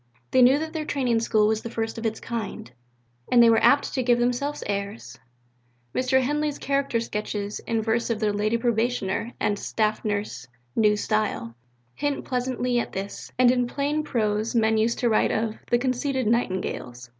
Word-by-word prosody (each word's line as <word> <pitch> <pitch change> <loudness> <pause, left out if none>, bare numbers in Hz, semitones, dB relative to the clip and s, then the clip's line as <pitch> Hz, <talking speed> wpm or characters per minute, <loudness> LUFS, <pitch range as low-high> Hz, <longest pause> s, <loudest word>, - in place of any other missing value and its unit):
They 260 - +5
knew 255 +3 +6
that 315 +1 -4
their 315 -2 -2
Training 255 -6 0
School 220 -2 +2
was 220 0 +1
the 230 - -6
first 225 0 -3
of 225 - -1
its 220 0 -4
kind; 220 - -5 0.6
and 240 -1 +7
they 230 - +7
were 225 - +3
apt 285 - +4
to 260 - 0
give 240 -1 +3
themselves 250 +5 -1
airs. 200 +2 -4 0.7
Mr. 260 +1 +2
Henley's 295 +2 -1
character 275 -3 0
sketches 210 -2 -4
in 225 -1 0
verse 230 +2 0
of 230 -2 -1
the 210 -2 +1
"Lady 215 +3 +1
Probationer" 235 -2 -1
and 205 -1 0
"Staff 215 -1 -1
Nurse, 205 - -3 0.3
New 210 -1 +3
Style," 210 - -1 0.4
hint 290 -1 -2
pleasantly 250 -1 -1
at - - -4
this, 195 +1 -6
and 250 -1 +6
in 250 -1 +1
plain 290 +4 -1
prose 220 -4 -1
men 220 -1 +3
used 230 +2 +1
to 245 - +1
write 220 - +3
of 220 0 -1
"the 240 - +4
conceited 260 +1 -1
Nightingales." 185 - -2
230 Hz, 180 wpm, -25 LUFS, 215-255 Hz, 0.7 s, and